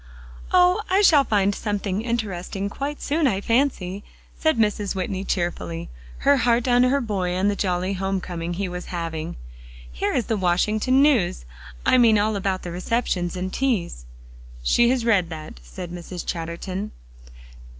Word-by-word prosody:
"Oh! 360 +2 +5
I 390 +3 +3
shall 300 -7 +6
find 205 -5 +2
something 205 -1 -2
interesting 200 -4 -3
quite 285 +4 -4
soon, 300 +1 +1
I 195 -6 +1
fancy," 205 -5 0 0.3
said 315 -5 +1
Mrs. 210 -2 0
Whitney 190 0 -2
cheerfully, 90 - -3 0.3
her 280 0 +6
heart 240 0 +2
on 245 0 +4
her 255 +3 +3
boy 195 -7 -2
and 195 +3 +2
the - - -2
jolly 185 0 -1
home 190 0 -1
coming 175 -1 -5
he 195 +2 -2
was 180 0 -6
having. 165 -2 -4 0.5
"Here - - -1
is 240 - +1
the 225 - -1
Washington 210 +8 +2
news; 210 - +2 0.4
I 255 - +5
mean 225 -3 +6
all 210 +1 +1
about 190 -1 -1
the 175 - -5
receptions 180 -2 -1
and 185 +1 -4
teas." 185 - -1 0.6
"She 240 - +4
has 250 -2 +1
read 195 -7 +3
that," 155 - -8
said - - -8
Mrs. 175 0 -7
Chatterton. 180 +4 -4
200 Hz, 160 wpm, -23 LUFS, 180-235 Hz, 0.6 s, shall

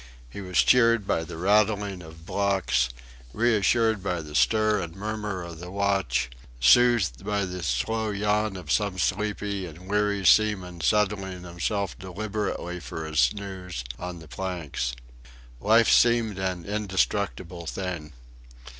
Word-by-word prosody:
He 100 - -7
was 90 -2 -4
cheered 115 -4 +5
by 80 - 0
the 80 - -8
rattling 100 0 +2
of 80 -1 -13
blocks, 95 -11 +1 0.4
reassured 110 -1 +2
by 90 -4 -2
the 75 -1 -10
stir 105 - +3
and 85 -2 -6
murmur 105 -2 -4
of 85 -2 -9
the 90 +1 -8
watch, 100 -10 0 0.3
soothed 105 - +4
by 100 -1 0
the 90 0 -6
slow 80 - -1
yawn 105 0 0
of 90 - -6
some 100 -3 +1
sleepy 100 0 -1
and 85 +3 -12
weary 105 -1 0
seaman 95 -5 +3
settling 95 0 0
himself 90 +3 -3
deliberately 95 -1 -4
for 80 -2 -6
a 80 0 -7
snooze 95 -7 -1 0.2
on 90 0 -5
the 80 -1 -12
planks. 80 -9 -4 0.6
Life 110 - +4
seemed 115 -4 +4
an 90 -3 -2
indestructible 95 -4 -2
thing. 85 -5 -4
95 Hz, 135 wpm, -26 LUFS, 85-105 Hz, 0.6 s, cheered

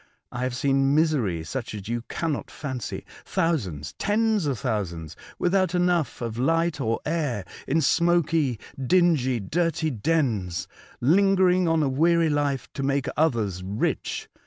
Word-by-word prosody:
I 120 - -5
have 130 -1 -1
seen 135 +1 +2
misery 130 - +1
such 120 +4 -5
as 100 -1 -7
you 120 +1 -2
cannot 160 -4 -2
fancy 130 -5 -5
— - - -19
thousands, 105 - -1
tens 215 -4 +1
of 135 -4 -1
thousands, 85 -9 -3 0.2
without 185 0 +1
enough 175 -8 +1
of 115 -1 -4
light 165 +3 +1
or 115 -2 0
air, 145 - -1 0.2
in 160 +4 +2
smoky, 160 -5 +2 0.2
dingy, 145 -6 +3
dirty 160 - 0
dens, 115 - 0 0.3
lingering 185 +4 +4
on 165 -1 +2
a - - +2
weary 165 +4 +3
life 145 -3 0
to - - -4
make 140 -1 0
others 115 - +1
rich. 100 +4 -2
140 Hz, 140 wpm, -25 LUFS, 120-165 Hz, 0.3 s, lingering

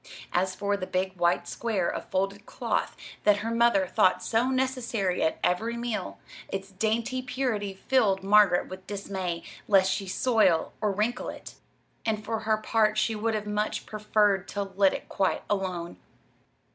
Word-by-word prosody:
As 185 +1 +1
for 205 0 0
the 185 -2 -5
big 190 +1 -1
white 175 0 +1
square 210 -7 -1
of - - -3
folded 195 +2 -2
cloth - - -2 0.3
that 210 -1 +5
her 230 - -1
mother 230 -5 +4
thought 185 0 +2
so 235 +3 +1
necessary 255 -8 0
at 160 - +1
every 225 +6 0
meal 220 - -3 0.3
its 195 0 -5
dainty 225 +6 -1
purity 250 -6 -2
filled 195 -3 +2
Margaret 200 -3 +5
with 185 0 -10
dismay 190 -4 -4 0.2
lest 190 -2 +5
she 195 0 -2
soil 195 -5 +2
or 210 -2 +2
wrinkle 215 +5 -1
it; - - -9 0.5
and 215 -1 -1
for 225 -1 -2
her 220 0 +1
part 215 0 +1
she 225 +1 +2
would 220 +1 -1
have 210 -1 -3
much 210 +1 -2
preferred 210 -2 +1
to 200 - -2
let 195 0 +2
it - - -7
quite 190 - 0
alone. 185 -4 -2
205 Hz, 160 wpm, -27 LUFS, 190-225 Hz, 0.5 s, that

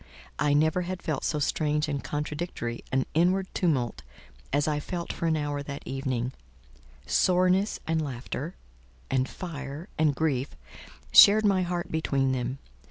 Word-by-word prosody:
I 145 0 +3
never 160 +4 +3
had 180 0 -5
felt 155 -6 -2
so 155 - 0
strange 150 +1 0
and 140 -2 -3
contradictory 150 -5 -4
an 130 -1 +1
inward 185 +4 +2
tumult 130 - 0 0.5
as 145 +2 +1
I 150 -1 +1
felt 170 +3 -4
for 165 - -2
an 160 -1 +2
hour 145 -1 -2
that 140 0 -7
evening: 130 -2 -2 0.7
soreness 185 - +2
and 160 0 0
laughter, 140 +3 -5 0.6
and 130 -1 +1
fire, 145 - -7
and 155 -3 +3
grief, 140 -4 -1 0.6
shared 215 +2 +9
my 195 -2 +4
heart 175 -1 -2
between 140 -4 +1
them. 130 0 -2
150 Hz, 145 wpm, -27 LUFS, 135-175 Hz, 0.7 s, shared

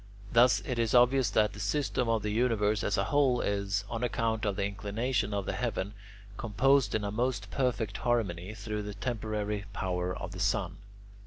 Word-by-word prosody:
Thus 120 +1 +5
it 125 -5 -2
is 115 0 +1
obvious 125 -1 +5
that 105 0 +2
the 100 - -9
system 125 +3 0
of 115 -2 +1
the 105 - -1
universe 110 -2 +1
as 100 - 0
a 100 - +2
whole 135 0 +2
is, 100 -1 -1
on 115 +2 -4
account 115 -2 0
of 100 -2 0
the 100 0 0
inclination 105 +4 -1
of 100 -1 -2
the - - -2
heaven, 100 +2 -2 0.4
composed 125 +1 +2
in 110 - 0
a 100 - -2
most 110 -3 -1
perfect 120 -6 -1
harmony 105 -5 -1
through 105 -2 -4
the 105 0 -6
temporary 105 -2 -3
power 90 -1 -2
of - - -6
the - - -8
sun. - - 0
110 Hz, 185 wpm, -30 LUFS, 100-120 Hz, 0.4 s, Thus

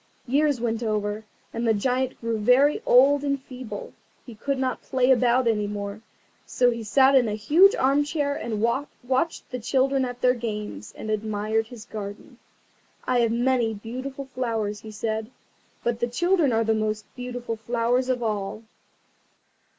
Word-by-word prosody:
Years 285 +1 +2
went 230 -1 -1
over, 215 -1 -2 0.3
and 230 +1 -2
the 220 - +4
Giant 255 +4 -1
grew 230 -1 -2
very 250 +7 +4
old 275 +3 +6
and 280 -1 0
feeble. 260 - -8 0.3
He 240 - -10
could 275 +5 -2
not 260 -1 -1
play 260 0 +2
about 250 0 +3
any 210 -3 +1
more, 205 0 -5 0.4
so 245 -1 +2
he 230 -1 -4
sat 265 +5 +4
in 255 -4 +5
a 210 - -1
huge 320 - +5
armchair, 290 +2 +1
and 220 -5 -3
watched 265 +4 -1
the 250 - -3
children 265 +3 +1
at 245 -1 -5
their 250 0 +4
games, 210 - -5
and 215 - -4
admired 215 +1 -1
his 230 -2 -11
garden. 205 -3 -8 0.7
"I 250 -1 +2
have 230 -1 +2
many 240 -1 +1
beautiful 260 +6 -6
flowers," 220 -4 -2
he 220 - -10
said; 220 +1 -3 0.5
"but 235 -1 -1
the 240 - 0
children 340 +3 +2
are 225 0 +2
the 225 0 +2
most 215 -1 -1
beautiful 245 -2 -5
flowers 235 +3 0
of 250 -2 0
all." 210 0 -3
240 Hz, 160 wpm, -25 LUFS, 220-260 Hz, 0.7 s, old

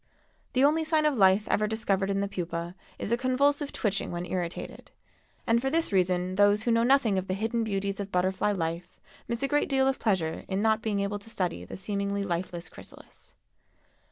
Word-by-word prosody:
The 255 - +3
only 310 +3 +4
sign 315 -1 +2
of 300 - +3
life 195 -1 +4
ever 210 0 +1
discovered 200 -3 0
in 195 0 0
the 200 - 0
pupa 170 -2 -4 0.2
is - - -4
a 235 - +3
convulsive 280 +3 +1
twitching 200 -2 -1
when 175 0 -4
irritated, 180 -2 -5 0.6
and 235 0 +3
for 270 - 0
this 325 0 0
reason 185 0 +1
those 205 +1 +4
who 235 - +1
know 230 0 +3
nothing 240 -5 +3
of 185 - -6
the 185 - -1
hidden 225 +3 -1
beauties 200 -2 -2
of 200 0 -5
butterfly 185 +3 +1
life 170 -1 -4 0.3
miss 235 +2 -3
a - - +2
great 295 +1 +1
deal 265 -1 +3
of 270 - 0
pleasure 185 -7 0
in 190 0 -1
not 220 0 +2
being 205 -2 -1
able 200 +1 -2
to 225 - -13
study 180 - -3
the - - -8
seemingly 200 +1 -2
lifeless 175 -1 -3
chrysalis. - - -13
200 Hz, 200 wpm, -28 LUFS, 185-235 Hz, 0.6 s, only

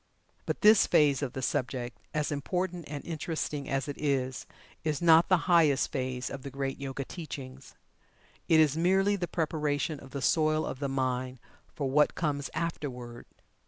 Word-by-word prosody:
But - - -2
this 215 -1 +7
phase 145 -3 +4
of 135 -3 -3
the 130 - -5
subject, 125 -1 -2
as 150 0 -1
important 180 +4 -2
and 145 -1 -6
interesting 155 -3 -3
as 135 +1 -1
it 145 - -6
is, 135 -3 -1 0.4
is 155 -3 -1
not 165 0 +6
the 185 -3 +3
highest 160 -6 +4
phase 130 -2 -3
of 135 - -6
the 140 - -7
great 135 0 -4
Yoga 135 0 -4
teachings. 135 -6 -8 0.7
It 160 - +6
is 155 -2 +4
merely 190 +4 +3
the 175 -3 -3
preparation 150 -3 -1
of 135 - -12
the 140 - -5
soil 155 +1 +2
of 130 - -5
the 140 -1 -2
mind 130 -1 -1 0.4
for 140 - -2
what 150 +3 +3
comes 145 -3 -1
afterward. 130 -7 -5
145 Hz, 165 wpm, -29 LUFS, 135-160 Hz, 0.7 s, this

